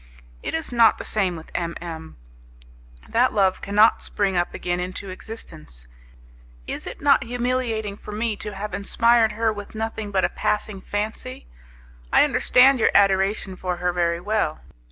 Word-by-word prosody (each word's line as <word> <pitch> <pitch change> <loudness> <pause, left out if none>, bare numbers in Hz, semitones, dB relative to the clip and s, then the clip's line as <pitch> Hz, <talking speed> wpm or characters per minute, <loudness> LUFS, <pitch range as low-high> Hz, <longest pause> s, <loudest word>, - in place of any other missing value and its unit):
It - - -3
is 160 - -3
not 230 -2 +5
the - - -6
same 190 -4 0
with 160 -1 -11
M 170 -1 -2
M; 160 -2 -8 0.9
that 245 +3 +2
love 195 -3 +2
cannot 210 +2 +4
spring 195 -2 -1
up 175 0 0
again 175 0 -3
into 185 +2 -5
existence. 75 - -10 0.8
Is - - -5
it - - -8
not 280 -2 +4
humiliating 240 -4 -2
for - - -10
me 215 +1 -1
to 210 -1 -7
have 210 +2 -5
inspired 230 +2 +3
her 225 0 0
with 205 +1 -9
nothing 220 -1 -4
but 195 -2 +1
a - - 0
passing 210 -2 -2
fancy? 205 - -5 0.7
I - - +6
understand 255 -1 +4
your - - +4
adoration 195 0 +2
for 180 -1 -3
her 180 0 -1
very 170 -1 0
well. 205 -5 -1
205 Hz, 160 wpm, -23 LUFS, 180-225 Hz, 0.9 s, I